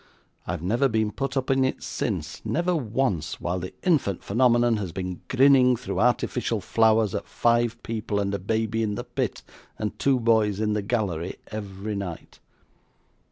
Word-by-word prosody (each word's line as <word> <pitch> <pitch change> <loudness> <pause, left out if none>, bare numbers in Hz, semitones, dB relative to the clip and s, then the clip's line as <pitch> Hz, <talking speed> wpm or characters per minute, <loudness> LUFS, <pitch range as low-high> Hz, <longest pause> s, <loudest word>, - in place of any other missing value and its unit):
I've 85 -1 -3
never 120 +9 +2
been 110 -2 +1
put 135 +2 -3
up 130 0 0
in 135 0 +3
it 130 - -1
since - - -3
never 175 +2 0
once 115 - -1
while 90 +1 -2
the 90 +1 -6
"infant 145 - +1
phenomenon" 120 +1 +3
has 95 -5 -4
been 90 0 -5
grinning 130 -1 +5
through 125 +1 -4
artificial 120 -1 +1
flowers 110 0 +3
at - - -3
five 120 0 +1
people 110 -2 -2
and 100 0 -1
a 100 - -1
baby 110 +3 -1
in 105 -2 -1
the - - -4
pit, - - -3 0.3
and 105 -1 -4
two 135 -2 +3
boys 110 -3 +2
in 105 -1 +1
the 105 - 0
gallery, 100 -6 -2 0.2
every 105 0 -5
night. 95 -4 -6
110 Hz, 165 wpm, -25 LUFS, 100-125 Hz, 0.3 s, grinning